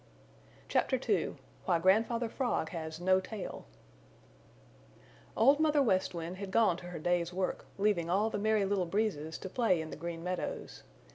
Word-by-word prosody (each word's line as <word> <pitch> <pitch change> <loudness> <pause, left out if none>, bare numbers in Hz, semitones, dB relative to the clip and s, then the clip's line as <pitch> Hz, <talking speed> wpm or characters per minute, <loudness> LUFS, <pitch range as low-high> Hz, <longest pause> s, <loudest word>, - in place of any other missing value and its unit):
CHAPTER - - +1
II - - +1 0.3
WHY 170 - +3
GRANDFATHER 225 +6 +2
FROG 240 -10 -1
HAS 160 -1 -6
NO 185 +1 +4
TAIL 200 +1 -7 1.7
Old 275 +6 +5
Mother 305 -2 +4
West 185 -6 +1
Wind 170 +2 -5
had 200 0 -5
gone 200 -3 +3
to 175 - -9
her 175 -1 -6
day's 175 +1 0
work, 185 +1 -3
leaving 195 -5 +1
all 205 +5 +2
the - - -2
Merry 215 -1 +2
Little 195 -2 0
Breezes 165 -6 -1
to - - -7
play 190 -3 +2
in 160 -1 -5
the - - -5
Green 165 +1 -6
Meadows. 180 0 -4
185 Hz, 160 wpm, -32 LUFS, 170-220 Hz, 1.7 s, Old